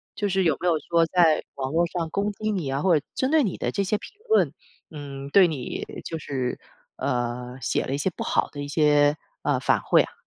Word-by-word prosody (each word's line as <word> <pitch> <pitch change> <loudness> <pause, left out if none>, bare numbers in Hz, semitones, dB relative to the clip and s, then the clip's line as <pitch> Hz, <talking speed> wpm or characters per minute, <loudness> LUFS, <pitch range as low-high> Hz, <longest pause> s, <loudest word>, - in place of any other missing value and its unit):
就 205 -2 -1
是 190 0 +1
有 160 -4 +3
没 180 - 0
有 165 -3 +3
说 165 +3 +2
在 165 -2 +4
网 135 0 -3
络 170 +1 +3
上 170 -1 -3
攻 200 +5 -1
击 215 +2 -4
你 180 -9 -2
啊， 135 +1 -1
或 175 -2 +4
者 145 - -5
针 260 +2 0
对 315 -2 +5
你 195 -7 -2
的 - - -2
这 200 - 0
些 205 +2 0
评 - - -11 0.2
论， 445 - +3 0.4
嗯， 140 -2 -7
对 190 +5 +7
你 135 -6 -4 0.2
就 165 - -4
是 130 -5 -3 0.4
呃， 125 0 -2
写 - - 0
了 - - -3
一 - - 0
些 145 - 0
不 - - -4
好 - - +1
的 145 - -7
一 145 - -4
些， 145 0 +3 0.3
呃， - - +1
反馈 - - +3
啊？ - - -10
160 Hz, 250 characters per minute, -25 LUFS, 140-185 Hz, 0.4 s, 对